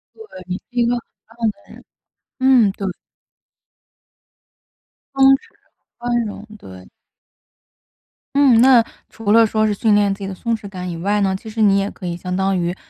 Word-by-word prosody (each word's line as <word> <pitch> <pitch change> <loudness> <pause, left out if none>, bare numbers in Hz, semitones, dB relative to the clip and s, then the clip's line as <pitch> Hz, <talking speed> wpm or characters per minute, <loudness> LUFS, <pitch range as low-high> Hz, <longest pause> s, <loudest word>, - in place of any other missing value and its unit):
对， 445 - -12 0.2
你 185 - -3
是 - - -18
一 240 -1 0
个 240 - +1
很 240 - -4 0.3
棒 230 0 -2
的 - - -20
人， - - -15 0.6
嗯， 255 -6 +4
对。 195 -2 -4 2.3
松 270 0 +2
弛， 270 - +3 0.6
宽 240 -1 -1
容， 210 0 -8
对。 95 - -13 1.5
嗯， 265 -5 +5
那 255 -3 +6 0.3
除 220 -2 -3
了 230 +1 +6
说 215 0 0
是， 210 - +1
训 215 0 +2
练 205 -1 +2
自 195 - -11
己 195 - -5
的 195 - -6
松 230 +4 -2
弛 205 -2 -9
感 180 -2 -6
以 170 - -6
外 205 +5 0
呢， 190 -1 +1
其 220 +3 -9
实 220 +1 -4
你 200 -2 +4
也 195 +1 -2
可 185 - -11
以 170 0 -3
相 180 +1 -5
当 190 0 0
于 175 +1 -2
210 Hz, 195 characters per minute, -19 LUFS, 195-235 Hz, 2.3 s, 那